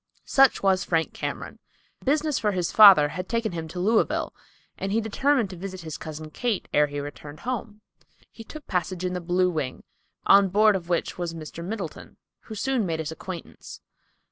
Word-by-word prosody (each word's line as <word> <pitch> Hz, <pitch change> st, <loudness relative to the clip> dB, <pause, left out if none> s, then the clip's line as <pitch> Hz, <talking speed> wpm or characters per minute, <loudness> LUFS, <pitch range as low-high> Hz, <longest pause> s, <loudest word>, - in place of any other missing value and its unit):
Such 270 Hz, -5 st, +4 dB
was 190 Hz, -1 st, +3 dB
Frank 165 Hz, -2 st, 0 dB
Cameron. -, -, -5 dB, 0.4 s
Business 300 Hz, +1 st, +1 dB
for 210 Hz, -2 st, 0 dB
his 180 Hz, -2 st, -1 dB
father 195 Hz, -9 st, +8 dB
had 185 Hz, +4 st, -6 dB
taken 230 Hz, -1 st, -1 dB
him 165 Hz, -2 st, -5 dB
to 180 Hz, +3 st, -7 dB
Louisville, 215 Hz, +5 st, +1 dB, 0.4 s
and 195 Hz, -, -4 dB
he 220 Hz, -, +2 dB
determined 230 Hz, 0 st, +1 dB
to -, -, -7 dB
visit 185 Hz, +1 st, -7 dB
his 160 Hz, -2 st, -7 dB
cousin 155 Hz, 0 st, -8 dB
Kate 235 Hz, +2 st, -2 dB
ere 150 Hz, 0 st, +4 dB
he 145 Hz, 0 st, -5 dB
returned 145 Hz, +1 st, -8 dB
home. 230 Hz, -4 st, -5 dB, 0.5 s
He 225 Hz, -, -11 dB
took 305 Hz, +5 st, -11 dB
passage 180 Hz, 0 st, -2 dB
in 180 Hz, -, -1 dB
the 180 Hz, -, -3 dB
Blue 180 Hz, +1 st, +1 dB
Wing, 150 Hz, -6 st, -4 dB, 0.4 s
on 195 Hz, -1 st, +6 dB
board 210 Hz, +2 st, +4 dB
of 175 Hz, -2 st, -5 dB
which 175 Hz, +1 st, -1 dB
was 170 Hz, -1 st, -3 dB
Mr. 160 Hz, +1 st, -8 dB
Middleton, 190 Hz, -4 st, -6 dB, 0.3 s
who 220 Hz, -, -8 dB
soon 260 Hz, +1 st, 0 dB
made 165 Hz, -4 st, -2 dB
his 160 Hz, -1 st, -4 dB
acquaintance. 170 Hz, +1 st, -9 dB
185 Hz, 185 wpm, -25 LUFS, 165-220 Hz, 0.5 s, father